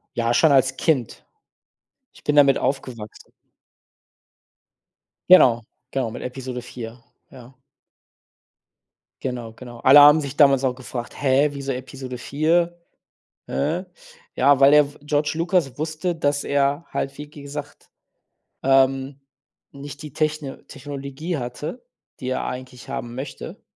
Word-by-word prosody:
Ja, 115 0 0
schon 160 - +5
als 135 -1 +3
Kind. 135 -9 -1 0.9
Ich - - -19
bin 150 0 0
damit 140 -2 +6
aufgewachsen. 125 -6 -4 2.0
Genau, 125 -10 +7 0.3
genau, 130 -5 -2
mit - - -8
Episode 125 -1 -6
4, 120 -1 -9 0.3
ja. 125 0 -14 1.7
Genau, 120 -3 -5
genau. 120 0 -11
Alle 135 +2 +8
haben 150 +2 +8
sich 140 -1 -6
damals 140 -3 +5
auch 130 -2 0
gefragt: 125 -2 -7
„Hä, 140 +1 +3
wieso 140 -1 -4
Episode 130 0 -7
4? 165 +6 0 0.7
Hä?“ 160 +6 -1 0.5
Ja, 140 +1 +4
weil 135 0 +7
der 145 -1 +5
w - - -18
George 150 0 0
Lucas 170 -4 0
wusste, 155 +3 -2
dass 145 -2 0
er 140 +3 0
halt, 135 - -3
wie 150 0 -8
gesagt, 145 0 -9 0.7
ähm, 135 +1 +2 0.5
nicht 140 +1 -10
die 150 -3 -9
Techn 155 -3 -3
Technologie 140 +4 -6
hatte, 145 - -6 0.3
die 130 - -4
er 130 - -2
eigentlich 125 0 -7
haben 120 0 -5
möchte. 135 +2 -8
140 Hz, 125 wpm, -22 LUFS, 130-150 Hz, 2.0 s, Alle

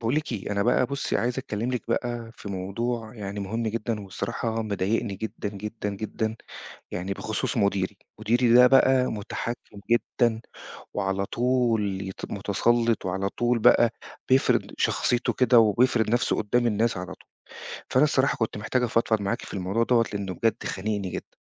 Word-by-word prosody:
باقول 115 +3 0
لِك 150 -3 -1
إيه، 105 -3 -4
أنا 100 0 +1
بقى 125 +3 +3
بُصّي، 140 +1 -1
عايز 120 +4 -1
أكلّم 120 -2 -3
لِك 125 - -2
بقى 120 -1 -2
في - - -9
موضوع 110 +5 -3
يعني 100 -2 -5
مهم 110 +4 -3
جدًا، 115 0 -2
وبصراحة 110 +3 -3
مضايقني 105 0 -1
جدًا، 105 0 -5
جدًا، 105 +1 -5
جدًا 110 +2 -3 0.6
يعني 90 +2 -3
بخصوص 110 +4 -3
مديري، 100 -2 0 0.2
مديري 120 +1 +3
ده 125 +1 +9
بقى 130 0 +5
متحكّم 110 0 -5
جدًا، 120 0 +1 0.5
وعلى 100 -1 -1
طول 115 -6 +1
يت 95 -1 -7
متسلّط 115 +3 +1
وعلى 95 +2 -1
طول 120 +3 0
بقى 115 +1 +5 0.4
بيفرِض 130 +1 +3
شخصيتُه 120 0 +1
كده، 125 -1 +4
وبيفرد 115 +1 +3
نفسُه 120 +1 +2
قُدّام 120 +3 +1
الناس 115 0 +1
على 90 +1 -4
طول، - - -23 0.6
فأنا 130 +3 +5
الصراحة 140 -2 +2
كنت 110 -2 -2
محتاج 115 +4 0
أفضفض 115 -2 +1
معاكِ 100 -1 -2
في - - -8
الموضوع 100 +4 0
دوَّة 115 -1 +3
لأنه 100 -2 -3
بجد 115 +5 0
خانقني 100 -1 -2
جدًا. - - -7
110 Hz, 160 wpm, -26 LUFS, 100-120 Hz, 0.6 s, ده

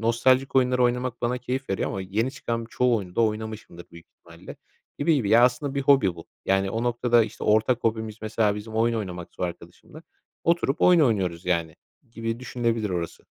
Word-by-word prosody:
nostaljik 130 +4 +2
oyunlar 125 -1 +3
oynamak 125 0 0
bana 120 +1 0
keyif 130 +1 -4
veriyor 95 - -1
ama 95 - -4
yeni 105 +7 -1
çıkan 115 -4 -4
çoğu 125 -1 +2
oyunu 90 -4 -6
da - - +3
oynamışımdır 110 -5 -3
büyük 85 0 -14
ihtimalle - - -13 0.4
gibi 160 +3 +3
gibi. 125 -8 0
Ya, 115 +2 +7
aslında 130 +3 0
bir 140 - -1
hobi 135 -10 +4
bu. 85 - -12 0.2
Yani, 95 0 +1
o 115 +3 -2
noktada, 120 -1 +2
işte, 110 - -8
ortak 110 +3 +2
hobimiz, 110 -1 -1
mesela, 110 -1 +1
bizim 110 +2 -8
oyun 115 +1 +2
oynamaksa 90 -7 -6
o - - +2
arkadaşımla 85 - -11 0.4
oturup 165 -3 +1
oyun 180 -2 +6
oynuyoruz, 95 - +1
yani, 85 -3 -1 0.3
gibi 115 0 -4
düşünülebilir 115 -4 -2
orası. 85 -2 -4
115 Hz, 185 wpm, -25 LUFS, 100-125 Hz, 0.4 s, Ya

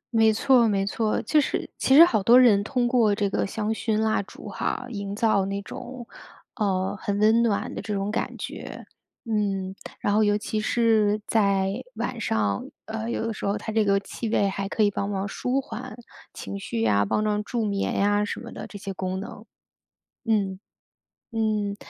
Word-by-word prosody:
没 220 -1 +5
错 240 +1 +4
没 195 -2 +1
错。 215 +1 0
就 300 +7 +3
是 - - -3
其 265 - +4
实 330 +4 +11
好 220 -11 +1
多 235 +6 +7
人 215 -6 +5
通 245 +2 0
过 230 -5 +3
这 200 -2 -1
个 - - 0
香 215 +2 -2
薰 220 -1 -1
蜡 220 -1 +1
烛 200 - -11
哈， - - -3
营 200 -3 -5
造 215 -3 +2
那 200 0 -2
种， 245 +3 -8 0.5
呃， 190 -4 0
很 200 0 -1
温 220 +2 +4
暖 220 -4 0
的 - - -5
这 210 - -3
种 195 +1 -2
感 - - -3
觉， - - -7 0.4
嗯。 200 -4 -1 0.3
然 205 - +1
后 215 +1 +4
尤 205 0 +3
其 215 +1 -3
是 215 -2 +2
在 200 -3 +2 0.2
晚 230 +1 -3
上， 105 - 0 0.2
呃， 220 +1 -4
有 225 - -2
的 230 - -2
时 - - -10
候 200 +1 0
它 220 - -5
这 220 0 +2
个 200 -1 +3
气 220 +2 -5
味 200 -3 +2
还 195 0 -3
可 220 - +1
以 205 - +3
帮 200 +1 -2
忙 195 0 -2
舒 250 +6 -1
缓 255 -3 -7 0.3
情 200 - -7
绪 115 -11 -3
呀， 100 -2 +3
帮 210 - 0
帮 210 0 0
助 230 0 -2
眠 200 -1 -1
呀 205 +1 +2
什 205 - -4
么 - - -9
的， - - -7
这 205 - -9
些 195 -1 -6
功 185 0 -3
能。 205 +2 -8 0.8
嗯， 200 -4 0 0.7
嗯， 215 -2 0
210 Hz, 210 characters per minute, -25 LUFS, 200-225 Hz, 0.8 s, 实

